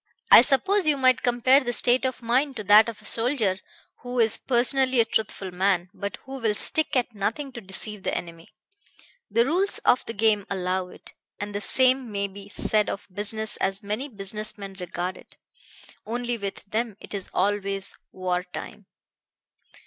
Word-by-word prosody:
I - - +11
suppose 375 +9 +2
you 295 -2 +3
might 255 -1 +3
compare 245 +2 +4
the 240 - -2
state 245 +3 +2
of 255 -1 -3
mind 260 +4 +1
to 215 - -5
that 210 +3 +6
of 215 -2 -10
a - - -13
soldier 225 -5 0 0.4
who 245 0 -5
is 225 -2 +4
personally 260 +1 +2
a 230 - +5
truthful 215 -4 -2
man, 180 -1 0
but 200 -1 -5
who 270 0 -7
will 220 -3 0
stick 315 +8 +1
at 245 -2 0
nothing 225 +7 -3
to 240 -2 -9
deceive 200 +1 -3
the - - -2
enemy. 165 -1 -9 0.8
The 230 +3 +3
rules 365 +8 +2
of 250 - +4
the 230 - -4
game 210 -1 +2
allow 185 -1 -2
it; - - -14 0.3
and 205 0 -5
the 205 - -3
same 255 0 +4
may 200 -1 -2
be 200 +1 -12
said 210 +1 +1
of 195 - -6
business 215 +2 0
as 195 +2 -1
many 215 +8 -4
business 210 0 -3
men 195 -1 -8
regard 180 +1 -4
it. - - -18 0.7
Only 240 +2 -3
with 200 -3 -6
them 215 0 -3
it - - -10
is 195 -2 -4
always 195 0 -1 0.2
war 180 -1 -2
time." 180 - -9
215 Hz, 180 wpm, -25 LUFS, 195-250 Hz, 0.8 s, I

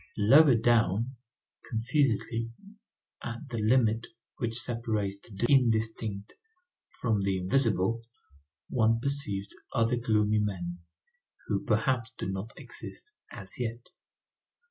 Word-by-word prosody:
Lower 130 +6 +7
down, 115 +1 +2 0.5
confusedly, 115 -1 0 0.7
at 120 +4 -6
the 115 -3 -3
limit 115 0 +3 0.3
which 115 0 0
separates 110 -5 -1
the 100 +1 -3
indistinct 110 -5 +1 0.7
from 110 -4 +1
the 95 -1 +1
invisible, 110 +1 +1 0.7
one 115 -2 +2
perceives 115 -8 -2 0.2
other 115 +1 +2
gloomy 110 -2 +2
men, 90 -4 -3 0.7
who - - -1
perhaps 130 -1 0
do - - -3
not 95 +4 -4
exist 425 - -7 0.2
as 95 +3 -7
yet. 120 0 -4
115 Hz, 100 wpm, -29 LUFS, 105-120 Hz, 0.7 s, Lower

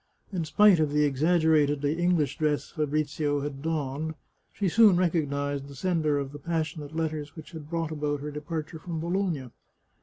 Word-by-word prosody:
In 175 -3 -1
spite 200 +3 +5
of 155 -2 +1
the 150 0 +3
exaggeratedly 150 -1 +2
English 175 -4 +1
dress 150 -2 0
Fa 155 -2 -1
brizio 145 -1 -1
had 140 -2 -5
donned, 155 0 -2 0.4
she 200 - -1
soon 210 +1 +6
recognised 145 -5 0
the 140 - -11
sender 155 -2 +1
of 140 -1 -3
the 145 - -9
passionate 155 -1 -3
letters 155 -2 -3
which 160 0 -10
had 155 -3 -9
brought 165 -1 -2
about 145 -2 -2
her 150 +1 -5
departure 155 +2 -5
from 165 0 -5
Bologna. 170 - -1
155 Hz, 170 wpm, -27 LUFS, 145-165 Hz, 0.4 s, soon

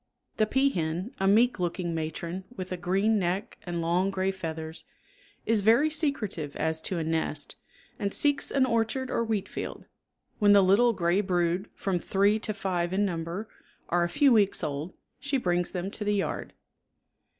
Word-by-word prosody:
The 215 - +3
peahen, 195 - 0
a 195 - +2
meek 225 +2 +4
looking 175 -1 -2
matron 165 +3 -4
with 185 0 -6
a - - -1
green 195 +5 +1
neck 185 +2 -2
and 170 -1 -2
long 175 +3 +1
gray 190 0 0
feathers, 160 -3 -6 0.6
is 225 -2 +2
very 235 +9 +4
secretive 220 - -2
as 160 0 0
to 185 - -2
a 165 - -1
nest, 160 -2 -2 0.4
and 200 -1 -1
seeks 285 +4 +1
an 270 -2 +3
orchard 235 +2 0
or 230 - +1
wheatfield. 215 -3 -4 0.5
When 205 -1 +6
the 200 -1 +7
little 220 +6 +4
gray 175 0 +2
brood, 180 0 0
from 190 -3 -1
three 200 +4 +2
to 215 - -2
five 180 -3 -1
in 205 +2 +2
number, 170 +3 -3 0.4
are 175 0 +2
a 170 - 0
few 270 +9 +4
weeks 205 -5 +3
old 150 +3 -4 0.2
she 285 -1 -1
brings 175 -6 0
them 185 +1 -4
to 210 - -4
the 210 0 +1
yard. 195 - -3
190 Hz, 170 wpm, -28 LUFS, 175-215 Hz, 0.6 s, the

